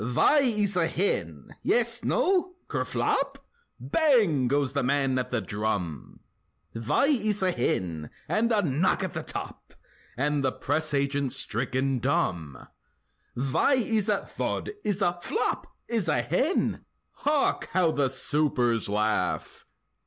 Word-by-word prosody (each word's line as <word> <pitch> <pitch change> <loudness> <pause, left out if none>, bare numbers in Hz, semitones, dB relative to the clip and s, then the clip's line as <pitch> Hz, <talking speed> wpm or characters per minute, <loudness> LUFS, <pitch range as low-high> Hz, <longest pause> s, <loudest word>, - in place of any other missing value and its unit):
Vhy 125 - +4 0.2
iss 200 -1 0
a 170 -2 +2
hen? 85 - -2
Yes? 235 0 +1
No? 370 -1 +1
(Kerflop?) 275 0 -1 0.4
Bang! 225 - +3
goes 140 0 +1
the 140 - 0
man 135 0 +1
at 125 - -3
the 120 -2 -1
drum; 100 -6 -3 0.5
Vhy 240 - +1
iss 210 -2 +1
a 185 - +3
hen? 85 - -2 0.2
(And 230 +2 +1
a 210 -2 +3
knock 155 +3 +1
at - - -3
the - - -3
top!) - - -6 0.4
And 145 +1 0
the 130 - +2
press 155 +1 -1
agent's 140 -1 +1
stricken 130 +3 0
dumb; 85 - -1 0.7
Vhy 135 - +2 0.2
iss 215 -1 +1
a—(Thud!)—iss 210 - -2
a—(Flop!)—iss 180 - -1
a 120 - +1
hen? 220 - 0 0.3
Hark! 295 0 0
how 180 -3 +3
the 140 -3 +1
supers 130 -5 0
laugh! 105 +1 -1
145 Hz, 125 wpm, -27 LUFS, -, 0.7 s, Vhy